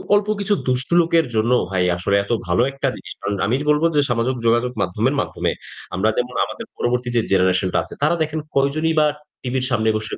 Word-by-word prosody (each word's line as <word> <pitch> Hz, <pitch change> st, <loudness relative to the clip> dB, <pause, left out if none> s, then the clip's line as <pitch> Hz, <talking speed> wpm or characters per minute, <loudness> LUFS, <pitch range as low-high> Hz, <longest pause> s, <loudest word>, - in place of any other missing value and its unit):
অল্প 205 Hz, 0 st, +1 dB
কিছু 200 Hz, +1 st, +1 dB
দুষ্ট 130 Hz, +1 st, 0 dB
লোকের 165 Hz, -1 st, +2 dB
জন্য 110 Hz, +2 st, +2 dB, 0.2 s
ভাই 95 Hz, -1 st, +1 dB
আসলে 95 Hz, +3 st, 0 dB
এত 100 Hz, -, -7 dB, 0.2 s
ভালো 90 Hz, +5 st, +2 dB
একটা 135 Hz, -, -2 dB
জিনিস। -, -, -9 dB
কারণ 100 Hz, -, -2 dB
আমি 110 Hz, +5 st, +1 dB
বলব 150 Hz, +1 st, +3 dB
যে 145 Hz, -, +5 dB
সামাজিক 120 Hz, +2 st, 0 dB
যোগাযোগ 120 Hz, +2 st, +2 dB
মাধ্যমের 110 Hz, +9 st, 0 dB
মাধ্যমে -, -, -2 dB, 0.4 s
আমরা 100 Hz, +4 st, +2 dB
যেমন 125 Hz, 0 st, -2 dB
আমাদের -, -, -8 dB
পরবর্তী 125 Hz, 0 st, -1 dB
যে 115 Hz, -, +4 dB
জেনারেশন 95 Hz, 0 st, +3 dB
টা -, -, +3 dB
আছে, -, -, -11 dB
তারা 155 Hz, +3 st, +3 dB
দেখেন 155 Hz, 0 st, -1 dB, 0.2 s
কয়জনই 150 Hz, +4 st, +1 dB
বা 150 Hz, -, +5 dB, 0.4 s
টিভির 130 Hz, 0 st, -2 dB
সামনে 110 Hz, -2 st, +2 dB
বসে 110 Hz, -1 st, -6 dB
125 Hz, 200 wpm, -21 LUFS, 110-145 Hz, 0.4 s, যে